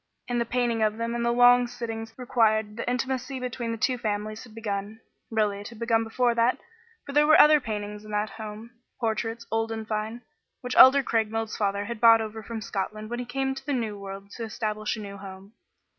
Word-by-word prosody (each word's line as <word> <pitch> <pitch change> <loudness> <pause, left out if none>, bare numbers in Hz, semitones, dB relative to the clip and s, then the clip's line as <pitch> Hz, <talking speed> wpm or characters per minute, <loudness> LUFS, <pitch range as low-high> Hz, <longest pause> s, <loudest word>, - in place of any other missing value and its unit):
In 245 -1 -1
the 235 - 0
painting 240 -1 0
of 215 0 +1
them 230 0 -2
and 235 0 -2
the 235 - +2
long 245 0 +6
sittings 225 -2 -6
required 220 -4 +1
the 230 - -3
intimacy 260 +1 -2
between 245 -2 -4
the 230 - -3
two 250 +3 0
families 215 0 -3
had 230 -3 -15
begun. 210 -1 -4 0.3
Really 210 -3 0
it 205 - -8
had 235 - -13
begun 230 0 +1
before 240 +2 +1
that, 235 +2 +2 0.5
for 280 - -7
there 295 +1 +4
were 310 - +7
other 300 0 +8
paintings 210 -3 -5
in 215 - -12
that 210 0 -1
home 220 +1 -8 0.3
portraits, 225 0 -2
old 225 0 0
and 220 -1 -5
fine, 220 +2 -3 0.4
which 250 0 -4
Elder 270 +2 +8
Craigmile's 225 -1 -1
father 200 -1 -1
had 235 0 -5
brought 230 0 +7
over 220 0 -5
from 225 0 -6
Scotland 215 +2 -4
when 240 - -3
he 245 - -4
came 265 +2 -1
to 265 - -9
the 290 - -2
new 225 -5 -2
world 195 0 -9
to 235 - -6
establish 215 -1 -3
a - - -6
new 200 -1 -8
home. 195 +1 -11
225 Hz, 215 wpm, -26 LUFS, 215-240 Hz, 0.5 s, other